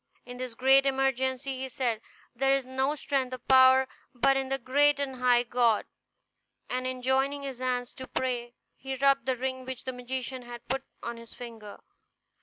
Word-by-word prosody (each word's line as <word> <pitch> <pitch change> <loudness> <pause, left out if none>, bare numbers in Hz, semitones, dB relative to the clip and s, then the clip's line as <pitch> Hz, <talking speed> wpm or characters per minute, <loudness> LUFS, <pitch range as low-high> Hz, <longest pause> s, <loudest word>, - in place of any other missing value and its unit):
In 245 0 -8
this 250 -2 -5
great 270 +2 +5
emergency 265 0 0
he 265 0 -4
said, 235 -3 -1 0.3
"There 270 +3 +2
is 270 -2 -2
no 265 +3 0
strength 270 -3 -1
or - - -9
power 260 +1 +6 0.3
but 270 +3 +4
in 270 -1 -1
the 270 - 0
great 285 +3 +3
and 270 -2 -3
high 245 -1 +4
God"; 235 -2 +2 0.8
and 255 0 -2
in 255 -1 -5
joining 270 +2 +1
his 270 -3 -6
hands 250 -1 -2
to 260 - -8
pray 245 -2 -2 0.2
he 265 0 -5
rubbed 275 -1 +3
the 260 -1 +1
ring 260 +1 -3
which 260 -1 -7
the 260 - -4
magician 255 +1 -4
had 240 -1 -10
put 265 +1 -1 0.2
on 235 0 -4
his 230 0 -13
finger. 225 -4 -10
260 Hz, 185 wpm, -29 LUFS, 245-270 Hz, 0.8 s, power